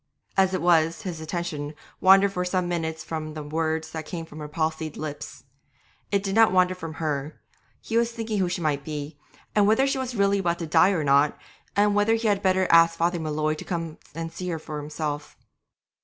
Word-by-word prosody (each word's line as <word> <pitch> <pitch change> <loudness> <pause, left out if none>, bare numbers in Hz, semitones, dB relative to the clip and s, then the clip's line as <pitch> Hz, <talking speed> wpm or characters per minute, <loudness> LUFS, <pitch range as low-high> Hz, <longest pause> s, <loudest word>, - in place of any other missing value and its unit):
As 190 -1 +3
it 185 - -2
was, 165 +2 +3
his 175 -5 -5
attention 155 -3 -4 0.2
wandered 195 +1 +6
for 180 - -1
some 180 0 0
minutes 160 -2 -3
from 155 -1 -5
the 155 - -5
words 160 +1 -2
that 160 -1 -6
came 165 -3 -5
from 155 -1 -11
her 150 - -6
palsied 160 0 -2
lips. 150 -1 -7 0.7
It 200 -1 +1
did 195 -1 -2
not 225 -1 +6
wander 185 0 +3
from 165 -3 -7
her; 150 -2 -3 0.4
he 225 - -2
was 235 0 +2
thinking 225 -2 -3
who 185 -2 +1
she 175 - -3
might 145 -3 0
be, 150 0 -6 0.3
and 205 -1 +4
whether 225 +6 +4
she 275 0 0
was 255 -2 -4
really 200 -1 +3
about 170 -3 0
to 170 - -4
die 160 +4 +5
or 180 -6 0
not, 140 +1 +3 0.4
and 205 0 +3
whether 205 +2 +3
he 225 0 -1
had 205 -2 +2
not - - -21
better 185 0 +3
ask 165 0 +6
Father 170 +1 +1
M'Leod 155 -1 -1
to - - -6
come 165 -3 -4 0.2
and 165 0 -4
see 180 +2 -5
her 165 - -2
himself. 150 -1 -5
165 Hz, 210 wpm, -25 LUFS, 155-195 Hz, 0.7 s, wandered